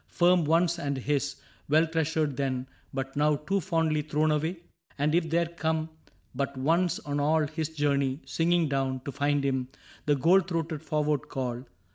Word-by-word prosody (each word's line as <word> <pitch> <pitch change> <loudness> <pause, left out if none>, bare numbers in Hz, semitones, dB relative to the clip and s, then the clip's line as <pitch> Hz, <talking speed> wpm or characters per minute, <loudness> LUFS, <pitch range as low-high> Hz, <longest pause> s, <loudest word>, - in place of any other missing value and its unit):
Firm 175 -1 +3
once 170 +2 +2
and 140 -3 -2
his, 140 +2 -1 0.3
well 155 +3 +5
treasured 160 -3 0
then, 130 -1 -2 0.2
but 135 0 -4
now 150 +1 +3
Too 195 +7 -1
fondly 160 -4 +1
thrown 155 +1 +1
away? 160 +4 0 0.4
And 150 +2 +1
if 165 -1 +2
there 170 +2 +2
come 160 -1 -2 0.4
But 140 +1 -3
once 165 +6 +2
on 145 0 -2
all 155 +2 +3
his 155 +1 -3
journey, 140 -3 0
singing 170 0 +2
down 135 -2 -1
To 140 - -5
find 145 +1 0
him, 130 -2 0 0.4
the 145 - +4
gold 170 +7 +4
throated 165 -3 -2
forward 150 -2 -1
call. 125 -1 -3
150 Hz, 165 wpm, -28 LUFS, 140-165 Hz, 0.4 s, well